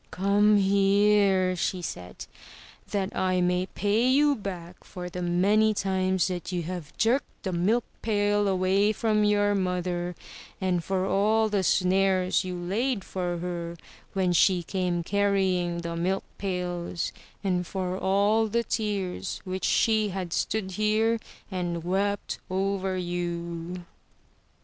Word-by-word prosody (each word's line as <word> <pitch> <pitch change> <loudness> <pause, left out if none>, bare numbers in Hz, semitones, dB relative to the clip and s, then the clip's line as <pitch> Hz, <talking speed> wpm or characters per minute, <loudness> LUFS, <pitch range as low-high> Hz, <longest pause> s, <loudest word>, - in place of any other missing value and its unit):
"Come 205 +2 +3
here!*' 195 -1 +3
she 180 +1 -2
said, 90 - -6 0.6
"that 200 -1 -2
I 185 -1 +1
may 180 +1 +1
pay 210 +6 +1
you 290 +2 +4
back 180 -5 -7
for 180 -1 -8
the 180 - -5
many 200 +5 +3
times 190 -1 +1
that 180 -1 -4
you 175 -2 -2
have 175 -3 -7
jerked 245 +5 0
the 190 - -2
milk 205 +8 +2 0.2
pail 205 -1 +1
away 195 +2 +2
from 215 -1 +1
your 205 0 +3
mother, 180 -2 -1 0.4
and 180 -3 0
for 190 +1 -1
all 215 +3 +2
the 205 -2 +1
snares 185 +1 +2
you 180 -1 -4
laid 205 +5 -1
for 180 -2 -3
her 170 -1 -4 0.4
when 185 -2 +1
she 180 +1 +4
came 180 -1 -1
carrying 190 -3 +1
the 170 0 -4
milk 185 +3 0 0.2
pails 180 -3 -3 0.3
and 180 -3 0
for 185 -1 -3
all 200 +4 +2
the 235 +2 0
tears 205 -5 -2
which 185 0 -3
she 220 -2 +2
has 180 -3 -4
stood 205 -3 -1
here 215 +3 +1 0.3
and 175 -3 -3
wept 200 +3 -1
over 190 0 -1
you!" 175 0 -4
190 Hz, 135 wpm, -27 LUFS, 180-205 Hz, 0.6 s, you